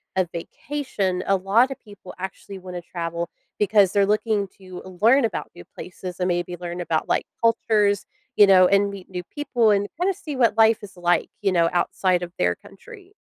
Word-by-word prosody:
a 185 -1 +1
vacation; 195 - -3
a 195 - +4
lot 200 +7 +3
of - - -7
people 205 -3 -13
actually 190 +1 -7
wanna 180 -1 -7
travel 170 0 -4 0.3
because 205 -2 +4
they're 200 0 +3
looking 210 -1 +1
to 185 -1 -10 0.2
learn 240 +4 +5
about 220 - -4
new 85 - -11
places 180 0 -8
and 180 - 0
maybe 175 0 -1
learn 175 0 -5
about, 160 -2 -1
like, - - +1 0.2
cultures, 210 -3 +2 0.3
you 205 - +8
know, 185 -2 +7
and 200 0 +3
meet 195 -2 -10
new 180 -1 -5
people 240 -5 +1
and 205 0 +1
kinda 380 +2 +1
see 295 -5 -7
what 235 -4 +2
life 225 0 +5
is 195 -2 -11
like, 175 0 +1
you 200 -2 +1
know, 170 -2 +3
outside 180 0 +1
of 175 - -6
their 90 0 +1
country. 395 - -15
195 Hz, 190 wpm, -23 LUFS, 180-220 Hz, 0.3 s, you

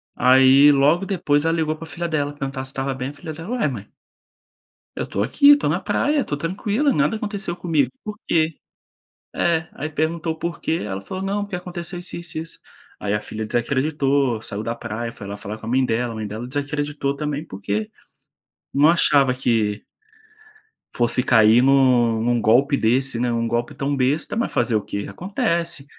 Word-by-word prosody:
aí, 130 +3 +6
logo 145 +7 +3
depois, 150 -7 +1
ela 165 - +2
ligou 155 -1 0
pra 165 - -9
filha 165 +2 -4
dela, 145 -3 -1
perguntar 135 -2 -5
se 135 - -10
estava 135 0 -2
bem, 130 0 -4
a - - -9
filha 155 +2 -8
dela: 165 +5 -9
"Ué, 245 -7 +1
mãe" 110 -7 -6 1.1
"eu - - -3
tô 100 - -1
aqui, 285 - +6
tô 285 - -1
na 165 +5 +1
praia, 280 +9 +1
tô 145 - -2
tranquila, 205 - 0
nada 225 - +1
aconteceu 200 -4 -4
comigo, 155 -7 +1
por 210 -1 -6
quê?". 160 -1 +1 0.8
É. 165 -2 +1
Aí 145 +3 -5
perguntou 160 +2 -1
o - - -18
porquê, 170 -1 -2
ela 95 -2 -4
falou 185 - -6
não, 200 +1 -1
porque 200 -2 -4
aconteceu 180 0 -6
isso, 175 - -7
isso, 170 -2 -6
isso, 165 +1 -7 0.4
aí 100 0 -1
a 105 - 0
filha 110 +1 -6
desacreditou, 135 0 0
saiu 100 -1 -5
da 115 +1 -3
praia, 115 0 -5
foi 105 - -10
lá 100 +1 -6
falar 105 +1 -6
com - - -14
a - - -4
mãe 130 +1 +3
dela, 120 0 -1
a - - -7
mãe 110 -1 -4
dela 110 +4 -6
desacreditou 145 +1 -2
também, 150 +1 -3
porque 100 +2 -4 0.8
não 145 +3 +5
achava 145 -6 +4
que 110 -5 0 1.1
fosse 120 +1 +2
cair 110 0 +5
em - - +5
um 125 -4 +4
em 120 - +1
um 120 -1 +1
golpe 130 +7 +4
desse, 125 +2 +1
né. 120 0 0
Um 115 0 0
golpe 120 +4 -2
tão 140 0 -2
besta, 140 +7 0
mas 235 - -1
fazer 115 - +1
o 105 - +2
quê? 100 0 -5
Acontece. 170 - -2
140 Hz, 195 wpm, -22 LUFS, 120-165 Hz, 1.1 s, aí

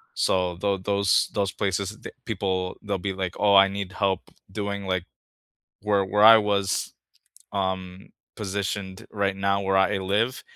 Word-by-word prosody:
So, 90 -1 +1
tho 100 +1 0
those 100 0 +1
those 100 -2 0
places, 100 +1 -2
th - - -8
people, 95 -4 -2
they'll 100 -2 -2
be - - -2
like, 95 -2 -4
"Oh, 100 -1 +4
I 100 0 +8
need 100 -1 -5
help 100 -3 0 0.3
doing, 100 -1 -4
like" 95 -2 -1 0.8
where 100 -1 +1
where 105 +2 +2
I 115 +1 +10
was, 100 -2 0 0.6
um, 95 -1 -3 0.3
positioned 100 -1 -4
right 100 -2 -1
now 100 0 +1
where 95 0 +1
I 95 +2 +3
a - - -3
live 110 +7 0
100 Hz, 160 wpm, -25 LUFS, 95-100 Hz, 0.8 s, I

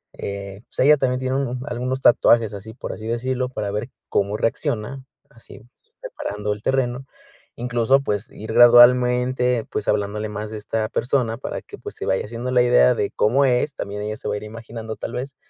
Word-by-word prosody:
eh 100 0 -6
pues - - -10
ella 150 +1 +7
también 125 -1 0
tiene 130 0 -1 0.3
algunos 130 +1 -2
tatuajes, 115 -3 +4
así, 105 +2 -9
por - - -6
así 110 +1 -8
decirlo, 125 +2 -1
para 105 -5 -4
ver 105 +5 -3 0.2
cómo 100 +1 0
reacciona, 120 +3 -2 0.3
así 115 -2 -15 0.4
preparando 105 - -4
el 105 - -10
terreno, 130 -1 0 0.5
incluso, 120 +2 +2
pues, 105 -5 -2
ir 110 +1 -7
gradualmente, 125 0 +5
pues, 105 - -3
hablándole 105 +1 -1
más 105 +1 -5
de 110 - -5
esta 110 +1 -2
persona 120 -3 0
para - - -5
que, - - -11
pues, - - -8
se - - -6
vaya 95 - 0
haciendo 120 +3 -5
la 125 -1 +4
idea 65 - +5
de - - -1
cómo 135 +6 +2
es, 125 +3 +1
también 105 +1 -5
ella 105 0 -3
se - - -7
va - - -1
a - - -2
ir - - -8
imaginando, 115 0 -7
tal - - -6
vez. 130 +2 -5
115 Hz, 190 wpm, -22 LUFS, 105-125 Hz, 0.5 s, ella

